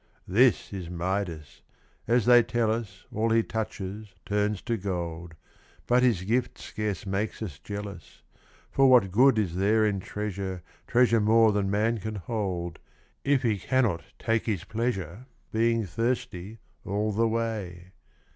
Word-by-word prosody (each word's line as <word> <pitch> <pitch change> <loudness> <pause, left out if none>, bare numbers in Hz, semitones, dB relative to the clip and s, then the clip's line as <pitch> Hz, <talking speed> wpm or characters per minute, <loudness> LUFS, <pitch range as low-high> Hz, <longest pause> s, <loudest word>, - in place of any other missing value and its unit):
This 115 +3 +3
is 90 -4 -5
Midas: 85 -3 -3 0.5
as 120 -1 +3
they 120 -1 +8
tell 115 -1 0
us, 105 -4 -5
All 110 +2 +1
he 115 0 +3
touches 105 -2 -5
turns 105 0 0
to 120 -1 -1
gold, 85 -4 -4 0.5
But 125 +1 +3
his 115 -8 +2
gift 120 +6 0
scarce 105 -2 -4
makes 100 +3 -2
us 80 -10 -7
jealous; 100 -2 -8 0.5
For 135 -1 +5
what 120 -7 +5
good 125 +4 +5
is 100 -6 0
there 105 +4 +3
in 100 -2 0
treasure. 95 -3 -4 0.2
Treasure 120 -2 +4
more 110 +1 +5
than 100 -1 0
man 110 +3 +1
can 110 +2 -5
hold. 95 -5 -3 0.4
If 140 -2 +2
he 110 -4 +1
cannot 115 -6 +1 0.2
take 115 0 0
his 100 -6 -1
pleasure, 110 -1 -3 0.2
Being 115 0 +2
thirsty 115 -1 -3 0.3
all 105 +1 -1
the 115 +3 +2
way 105 -6 -3
105 Hz, 145 wpm, -27 LUFS, 95-115 Hz, 0.5 s, they